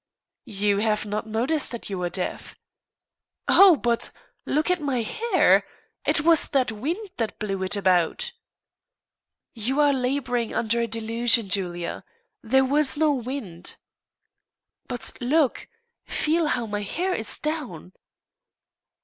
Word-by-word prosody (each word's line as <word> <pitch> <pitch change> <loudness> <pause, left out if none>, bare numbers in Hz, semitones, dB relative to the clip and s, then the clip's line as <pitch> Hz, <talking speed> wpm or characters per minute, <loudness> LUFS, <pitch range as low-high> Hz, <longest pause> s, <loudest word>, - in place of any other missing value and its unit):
"You 200 -1 +1
have 215 0 0
not 210 +1 -4
noticed 250 +8 +1
that 235 - -6
you 190 - -3
were 175 -1 -1
deaf." 180 0 -5 0.9
"Oh! 385 -3 +7
but 235 -4 0 0.4
look 305 +5 +1
at 360 -2 0
my 265 -5 -1
hair; 460 - +3 0.4
it 300 - +4
was 330 0 +4
that 260 -4 +1
wind 330 - -4
that 225 -2 -3
blew 195 -2 -3
it 190 +2 0
about." 190 - +1 1.2
"You 250 +5 -2
are 290 -1 +4
labouring 250 -2 -1
under 235 0 +1
a 235 - -1
delusion, 230 -1 +2
Julia. 175 -3 -2 0.4
There 265 +4 +3
was 290 +1 +3
no 310 0 +3
wind." 240 -9 -5 1.1
"But 245 -2 -2
look 280 +2 +1 0.4
feel 320 +1 +1
how 240 -5 -1
my 205 -1 -3
hair 360 - -2
is 220 -10 -3
down." 260 - -5
240 Hz, 130 wpm, -24 LUFS, 210-295 Hz, 1.2 s, Oh